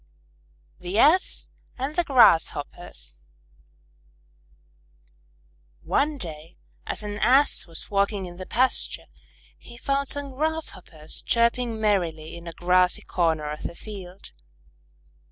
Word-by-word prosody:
_ - - -25
THE 180 +3 -3
ASS 320 +10 +3 0.3
AND 270 +4 -3
THE 350 - +3
GRASSHOPPERS 165 - +2 2.6
One 295 +1 +1
day 165 - -8 0.3
as - - -3
an 205 0 -5
Ass 270 0 +4
was 165 +3 -6
walking 200 -1 +1
in 175 -1 -9
the 185 - -8
pasture, 255 +3 +1 0.5
he 235 - -13
found 275 +2 -1
some 285 -1 -4
Grasshoppers 275 - -3
chirping 235 -1 +1
merrily 170 -7 0
in 170 0 -10
a 170 - -6
grassy 180 +1 +3
corner 160 -4 0
of 150 - -6
the 170 - -5
field. 195 -3 -9
200 Hz, 115 wpm, -25 LUFS, 170-260 Hz, 2.6 s, Ass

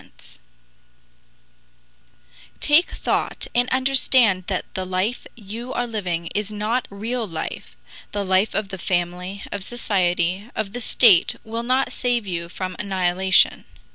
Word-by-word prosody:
Take 300 +4 +4
thought - - -2
and 245 +1 +2
understand 255 -7 +3
that 190 -3 -2
the 185 - -2
life 185 +6 -2
you 230 +4 -7
are 245 - 0
living 180 -7 -3
is 210 0 -2
not 215 +4 -1
real 225 +3 -3
life 160 - -6 0.4
the 205 -1 -2
life 190 +3 +2
of 210 -2 -1
the 190 -1 -7
family, 180 +2 -2
of 200 -2 -4
society, 190 -3 0
of 215 -2 -3
the 245 - -2
state 220 -6 +5
will 225 +1 -4
not 255 +3 +1
save 245 -3 0
you 170 -3 -4
from 185 +1 -5
annihilation. 190 -1 +2
200 Hz, 130 wpm, -22 LUFS, 185-235 Hz, 0.4 s, state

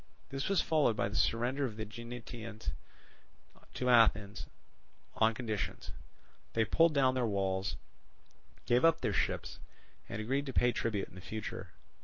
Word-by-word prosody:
This 135 +4 -3
was 195 -4 +3
followed 150 -8 +3
by 100 - 0
the 105 - -6
surrender 120 +5 +1
of 120 -6 -2
the 110 - -3
Aeginetans 115 -1 -7 1.0
to 125 - -1
Athens 105 -4 +4 0.7
on 110 0 +3
conditions; 110 -4 -3 0.6
they 115 -1 +3
pulled 165 +3 +4
down 130 -2 +4
their 125 -2 +1
walls, 95 -1 -1 0.9
gave 120 +1 +3
up 165 0 +5
their - - 0
ships, - - -1 0.5
and 105 - -4
agreed 135 +6 -1
to 135 - -4
pay 120 0 +4
tribute 105 -4 -2
in 95 - -11
future. 110 +4 -6
115 Hz, 145 wpm, -33 LUFS, 110-130 Hz, 1.0 s, up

